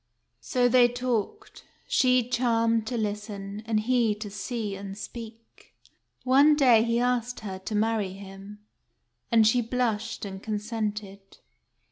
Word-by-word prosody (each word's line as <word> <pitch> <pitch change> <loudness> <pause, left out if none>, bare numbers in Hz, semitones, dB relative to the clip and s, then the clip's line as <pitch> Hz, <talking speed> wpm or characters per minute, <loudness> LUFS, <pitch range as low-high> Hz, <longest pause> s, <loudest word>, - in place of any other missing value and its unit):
So 250 -2 +1
they 245 0 +6
talked, 245 - -3 0.2
she 250 -2 +3
charmed 230 -2 +1
to 245 - -2
listen, 210 -1 -4
and 215 -2 +1
he 235 -2 +2
to 210 -1 -7
see 210 0 -4
and 195 0 -8
speak. 225 0 -11 0.5
One 280 +4 +5
day 250 -6 +5
he 230 +1 +1
asked 245 0 -1
her 190 -3 -6
to 210 +3 -5
marry 215 -3 0
him; 195 +1 -11 0.7
and 225 -2 +5
she 240 +3 +4
blushed, 225 -2 -2
and 190 -1 -7
consented. 210 -2 -5
225 Hz, 130 wpm, -27 LUFS, 210-245 Hz, 0.7 s, they